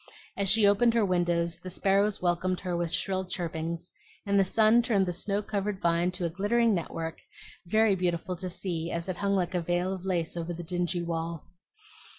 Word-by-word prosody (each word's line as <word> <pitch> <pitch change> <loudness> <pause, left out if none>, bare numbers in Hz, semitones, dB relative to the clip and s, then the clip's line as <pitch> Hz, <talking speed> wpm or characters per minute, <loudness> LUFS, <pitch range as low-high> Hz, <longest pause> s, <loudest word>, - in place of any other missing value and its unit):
As 200 -1 -1
she 215 +1 +5
opened 230 +4 +4
her 225 -3 +4
windows 170 -2 +1
the 185 - -8
sparrows 195 +2 +2
welcomed 180 +1 0
her 180 -2 -2
with 170 -1 -1
shrill 190 +1 -1
chirpings, 170 -1 -4 0.3
and 200 0 +3
the - - +6
sun 220 +4 +4
turned 210 -5 +2
the 180 - -2
snow 200 +3 -1
covered 200 -1 -2
vine 170 0 +2
to 180 -1 -2
a - - 0
glittering 220 +5 +2
network 165 -2 -3 0.5
very 220 +2 +4
beautiful 180 -1 -1
to 185 +1 -4
see 170 -2 -3
as 170 +1 -3
it 180 - -3
hung 200 0 +1
like 180 -1 0
a 180 - 0
veil 175 +2 0
of 185 -2 -7
lace 175 -4 -1
over 170 0 -3
the 175 - -6
dingy 175 0 -1
wall. 165 -1 -3
180 Hz, 195 wpm, -28 LUFS, 170-200 Hz, 0.5 s, the